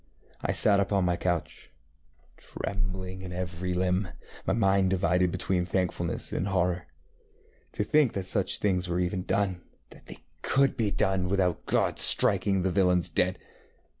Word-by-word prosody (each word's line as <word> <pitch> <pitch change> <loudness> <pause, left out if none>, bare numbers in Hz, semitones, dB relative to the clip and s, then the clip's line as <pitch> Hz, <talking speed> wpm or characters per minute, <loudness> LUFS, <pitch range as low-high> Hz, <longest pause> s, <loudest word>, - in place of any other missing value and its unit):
I - - -1
sat 100 -1 +4
up 100 0 -1
on 95 -2 +2
my 90 0 +1
couch, 85 -2 -3 0.6
trembling 95 -1 -5
in 95 -1 -7
every 90 0 -4
limb, 90 +2 0 0.4
my - - +2
mind 95 -3 +2
divided 90 -1 +1
between 90 0 -1
thankfulness 90 -1 -3
and 90 - -1
horror. 90 -3 -1 0.9
To - - -1
think 140 +3 +2
that 95 -2 -4
such 95 0 0
things 90 -3 -1
were 90 +1 -1
ever 90 +1 -1
doneŌĆöthat 95 -1 -1 0.5
they - - -9 0.2
could 135 0 +2
be 110 -3 0
done 95 -3 0
without 95 -3 0
God - - 0
striking 95 -1 +4
the 95 - 0
villains 90 -1 +2
dead. 90 +1 -1
95 Hz, 150 wpm, -27 LUFS, 90-100 Hz, 0.9 s, sat